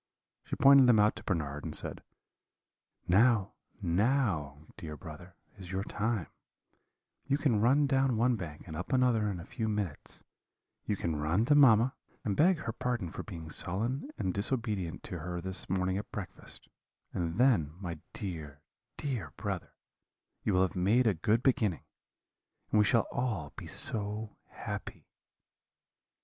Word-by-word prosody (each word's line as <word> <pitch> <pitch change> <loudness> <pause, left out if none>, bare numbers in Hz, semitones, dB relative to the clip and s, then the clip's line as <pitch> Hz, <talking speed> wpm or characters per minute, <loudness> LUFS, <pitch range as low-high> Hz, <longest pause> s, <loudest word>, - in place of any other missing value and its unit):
She - - -4
pointed 140 -1 +7
them 115 -3 +6
out 105 +1 +4
to - - -9
Bernard, 75 -6 -2
and - - -2
said: - - -3 1.1
"'Now, 105 +1 +4 0.3
now, 85 - +1
dear 75 -2 -7
brother, 85 +4 -11 0.2
is 90 -2 -8
your 95 +1 -1
time; 105 -3 -1 1.0
you 140 0 +2
can 120 -9 +2
run 135 +6 +4
down 135 -3 +2
one 120 +2 +3
bank 80 -7 -7
and 80 - -7
up 90 - -5
another 120 -5 +3
in 95 -3 -4
a 85 - -8
few 110 -2 -3
minutes; 105 -8 -4 0.6
you 105 - +1
can 85 -5 -2
run 80 +9 +1
to 145 - +4
mamma, 130 -4 +6 0.3
and 100 -3 0
beg 175 - +4
her 115 - -3
pardon 115 -7 -2
for - - -5
being 80 -6 -8
sullen 115 - -2
and 95 -4 -1
disobedient 105 -5 -2
to 90 - -6
her 90 +2 -4
this 95 +1 -3
morning 95 +1 0
at 105 - -9
breakfast; 100 -4 -8 0.5
and 85 -2 -2
then, 105 - +3
my 85 -5 -5
dear, 75 -7 -6 0.3
dear 115 - -3
brother, 100 -5 -4 0.7
you - - +1
will 90 - +5
have 95 - -1
made 105 +8 +3
a 110 - +4
good 105 +8 +1
beginning, 110 - +1 0.9
and 110 - +4
we 105 - +5
shall 115 +1 +3
all 110 - -2
be - - -8
so 105 0 -1
happy.' - - -7
100 Hz, 155 wpm, -31 LUFS, 85-120 Hz, 1.1 s, pointed